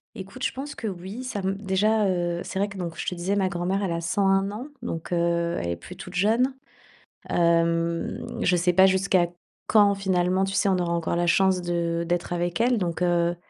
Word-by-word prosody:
Écoute, 210 +5 -8
je - - +1
pense 280 +3 -6
que 225 - -5
oui, 195 +6 -6
ça 210 -5 -4
me 190 +1 0
déjà, 205 +2 +1
heu, 175 -2 -1
c'est - - -6
vrai 200 - +2
que 195 - -10
donc, 170 -3 -5
je - - -4
te - - -1
disais, 180 +4 -1
ma 190 -2 +1
grand-mère, 190 +2 -1
elle 185 - -1
a 170 0 -2
101 195 +3 +2
ans. 225 +7 -6
Donc, 165 -7 -5
heu, 170 0 +1
elle 85 - -3
est 85 - -1
plus 85 - -11
toute 180 - -10
jeune. 230 +8 +2 0.7
Hem, 170 0 +1 0.2
je 180 - +3
sais 175 +1 +2
pas 190 +2 +7
jusqu'à 190 -2 +2 0.4
quand, 205 -2 +5
finalement, 185 -1 +1
tu 195 - -2
sais, 195 +1 +2
on 190 -1 +3
aura 175 -1 -1
encore 170 0 -1
la 175 0 +1
chance 190 +1 +3
de 170 -1 -1
d'être 175 0 -1
avec 175 +3 -2
elle, 245 +1 +3
donc, 175 -4 -2
heu. 175 -1 +2
185 Hz, 220 wpm, -25 LUFS, 170-195 Hz, 0.7 s, pas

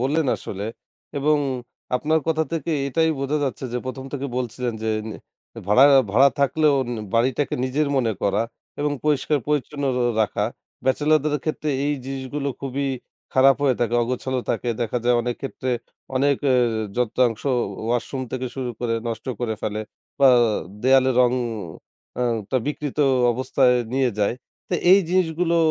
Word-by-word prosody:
বললেন 145 +4 +1
আসলে। 100 +1 -6 0.5
এবং 150 +2 +3 0.6
আপনার 155 +4 +1
কথা 160 0 +2
থেকে 165 0 -2 0.2
এটাই 160 +3 +2
বোঝা 140 +2 0
যাচ্ছে 135 0 -3
যে 125 - 0
১ম 130 +1 -5
থেকে 140 -1 -3
বলছিলেন 125 0 -2
যে 110 - -1 0.2
নে 110 - -6 0.5
ভাড়া 105 +7 +6 0.3
ভাড়া, 135 +6 +6
থাকলেও 150 +1 +3
উম 120 - -6 0.2
বাড়িটাকে 130 +4 +1
নিজের 140 +3 0
মনে 115 -4 +2
করা 100 +2 +2 0.4
এবং 145 0 0
পরিষ্কার-পরিচ্ছন্ন 150 0 0
রো 125 - +1 0.2
রাখা। 105 -1 -1 0.4
ব্যাচেলর 150 +4 +3
দের 150 -1 +1
ক্ষেত্রে 155 -1 -2 0.2
এই 145 - +1
জিনিসগুলো 135 +1 -4
খুবই 140 +1 -2 0.5
খারাপ 135 +1 +6
হয়ে 135 -4 +3
থাকে, 120 0 +1
অগোছালো 130 +1 -2
থাকে। 125 - -2
দেখা 120 +1 0
যায় 125 0 +4
অনেক 120 0 -2
ক্ষেত্রে 130 -1 -3 0.5
অনেক 140 +1 +3 0.2
এ - - +4 0.4
যন্ত্রাংশ 120 -1 +1 0.4
ওয়াশরুম 120 +3 -1
থেকে 130 0 -2
শুরু 130 -2 -3
করে 115 -2 0
নষ্ট 110 +1 -5
করে 115 -2 -1
ফেলে। 105 0 -2 0.4
বা 135 - +8 0.5
দেওয়ালের 130 0 +4
রং 125 -1 +4 0.9
আ - - +2 0.3
টা 130 - +2
বিকৃত 150 -1 -4 0.3
অবস্থায় 130 +1 +2 0.2
নিয়ে 135 -2 +2
যায়। 105 +3 +2 0.4
তো - - +1 0.2
এই 195 - +7
জিনিসগুলো 170 -1 +1
130 Hz, 150 wpm, -23 LUFS, 125-145 Hz, 0.9 s, বা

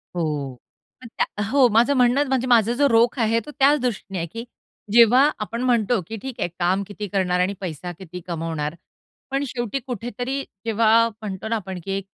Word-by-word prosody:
हो, 150 -6 -2 0.5
पण 250 - -10
त्या - - +3
अ, - - -1
हो, 270 0 +5
माझं 235 +6 +4
म्हणणं 255 +3 +3
म्हणजे 260 -1 0
माझा 235 -2 +4
जो 285 +3 +3
रोख 230 +2 +3
आहे, 225 0 +2
तो 295 - -10
त्याच 285 +2 +5
दृष्टीने 225 -6 -3
आहे, 170 - -3
की 230 +7 -7 0.5
जेव्हा 240 +5 +6
आपण 225 +3 -4
म्हणतो, 240 -2 +2
की 225 - -6
"ठीक 265 0 -6
आहे, - - 0
काम 185 +3 +1
किती 205 0 -6
करणार 180 -2 0
आणि 185 +2 +1
पैसा 175 -1 -5
किती 180 -1 -8
कमवणार." 165 -2 -3 0.6
पण 275 +1 0
शेवटी 240 +1 -3
कुठेतरी 245 +2 -4 0.2
जेव्हा 225 +1 +4
म्हणतो 210 -2 -7
ना 230 - 0
आपण, 190 -4 -5
की 195 - -5
एक 195 - -6
225 Hz, 190 wpm, -23 LUFS, 190-245 Hz, 0.6 s, जेव्हा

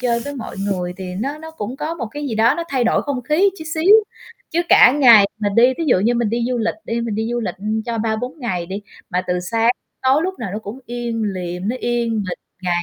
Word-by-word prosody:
chơi 235 -2 +1
với 285 0 -5
mọi 240 - -7
người, 180 -2 -2
thì 185 -1 -6
nó 275 +9 -3
nó 320 +1 -9
cũng 255 -5 -6
có 325 +3 -3
một 235 -8 -4
cái 290 +2 -5
gì 225 - -3
đó 230 +5 +4
nó 340 - -3
thay 255 -3 +1
đổi - - +2
không 275 -4 -3
khí 330 +10 +3
chút 315 - -7
xíu. 370 +7 +6 0.5
Chứ 345 +1 +1
cả 250 - +8
ngày 230 -8 +8
mà 205 -1 0
đi, 245 +3 +6
ví 330 - -1
dụ 245 - +4
như 230 +5 +2
mình 235 -2 +1
đi 235 0 0
du 250 -1 -1
lịch 225 0 0
đi, 230 +1 -2
mình 230 -2 -2
đi 220 +2 -1
du 240 0 -1
lịch 185 -6 -3 0.3
cho 230 -1 -2
3-4 230 +6 -2
ngày 180 -8 -2
đi, 195 +3 -5 0.3
mà 180 +1 0
từ 180 0 0
sáng 225 +6 +2 0.3
tới 260 - +3
tối, 305 - +2
lúc 375 +1 -3
nào 225 -5 -4
nó 210 - -3
cũng 220 +4 -8
im 235 -1 -3
lìm, 185 -1 -3
nó 250 - -1
yên 240 -1 -1
bình 200 -5 -3 0.2
ngày 175 -1 0
235 Hz, 260 wpm, -20 LUFS, 205-260 Hz, 0.5 s, cả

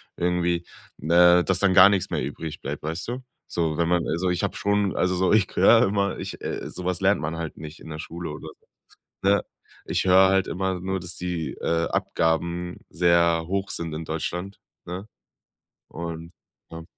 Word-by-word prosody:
irgendwie, 85 0 0 0.3
ne, 85 +3 +5
dass 95 -2 0
dann 100 -1 +3
gar 90 +2 +9
nix 100 -2 0
mehr - - -1
übrig 75 +3 -6
bleibt, - - -5
weißt 80 +7 -4
du? 125 +2 -5 0.2
So, 80 -3 -1
wenn 85 -1 +1
man 85 -1 +1
also 90 +3 0
ich 90 0 0
hab 100 - -1
schon, 100 -1 0
also 90 0 +1
so, 95 +2 +2
ich 105 -3 +4
höre 115 +5 +6
immer, 100 -1 0
ich, - - -7
äh - - -4
so 90 - -8
was 90 0 -1
lernt 100 +2 +3
man 75 +2 -3
halt 80 -1 -5
nicht 80 +1 -9
in - - -12
der 75 0 -6
Schule 85 +2 -6
oder 75 +1 -8
sowas, - - -37 0.5
ne? 100 +1 +3 0.4
Ich - - 0
höre 95 +1 +6
halt 95 0 +2
immer 95 0 -2
nur, 95 0 -2
dass 85 0 -7
die, 85 -5 -3
äh, 85 0 0
Abgaben 85 +2 -1
sehr 85 -1 +3
hoch 100 +2 -2
sind 85 -1 -4
in 80 +1 -5
Deutschland, 90 +5 -4 0.2
ne? 95 +5 -7 0.8
Und 85 0 -7 0.4
ja. 80 0 -8
90 Hz, 190 wpm, -25 LUFS, 80-95 Hz, 0.8 s, gar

